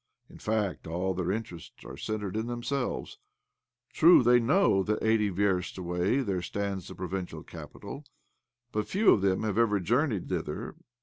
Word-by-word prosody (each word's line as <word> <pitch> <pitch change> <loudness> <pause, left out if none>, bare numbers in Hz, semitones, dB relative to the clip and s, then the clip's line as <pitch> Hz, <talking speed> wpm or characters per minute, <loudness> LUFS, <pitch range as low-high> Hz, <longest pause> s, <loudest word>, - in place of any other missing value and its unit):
In - - -13
fact, 105 -6 -2
all 90 +3 -1
their 90 0 -1
interests 95 -6 -6
are - - -8
centred 105 -3 -4
in 110 +1 -2
themselves. 120 +2 -3 0.7
True, 165 -4 +7
they 120 +1 +6
know 120 - +3
that 105 +3 -1
eighty 110 -2 +3
versts 95 -2 0
away 90 +8 0
there 95 -7 -1
stands 100 0 -3
the - - -9
pro 90 - -5
vincial 95 0 -5
capital; 145 - -9 0.7
but 105 -1 -2
few 205 +2 +4
of 100 - +4
them 95 0 +1
have 110 0 0
ever 105 -3 +3
journeyed 115 - 0
thither. - - -4
105 Hz, 165 wpm, -29 LUFS, 95-115 Hz, 0.7 s, True